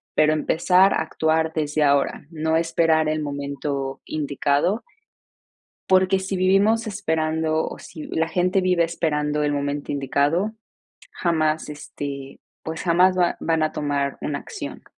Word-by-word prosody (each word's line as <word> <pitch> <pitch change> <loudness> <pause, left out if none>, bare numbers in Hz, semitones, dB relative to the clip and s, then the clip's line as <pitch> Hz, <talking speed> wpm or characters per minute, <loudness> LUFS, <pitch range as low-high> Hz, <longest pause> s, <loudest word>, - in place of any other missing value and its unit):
pero 155 0 +4
empezar 180 +5 +3
a - - 0
actuar 160 0 0
desde 150 -1 0
ahora, 140 0 +1
no 160 0 0
esperar 165 -1 +2
el 155 0 0
momento 140 -1 -4
indicado. 145 - 0 1.1
Porque 190 0 +4
si 190 +1 -3
vivimos 200 +5 +3
esperando 160 -5 -1
o - - -7
si 155 - -9
la 160 0 0
gente 180 +3 +1
vive 180 -2 +2
esperando 150 -3 -1
el 145 0 +1
momento 145 0 -3
indicado, 145 +8 0 0.6
jamás, 160 -3 0
este, 140 -2 -7 0.2
pues 160 0 -5
jamás 180 +2 +4
va 175 -1 +2
van 160 -1 +1
a 155 - 0
tomar 140 -1 -2
una 140 -1 -2
acción. - - -8
160 Hz, 135 wpm, -23 LUFS, 145-175 Hz, 1.1 s, pero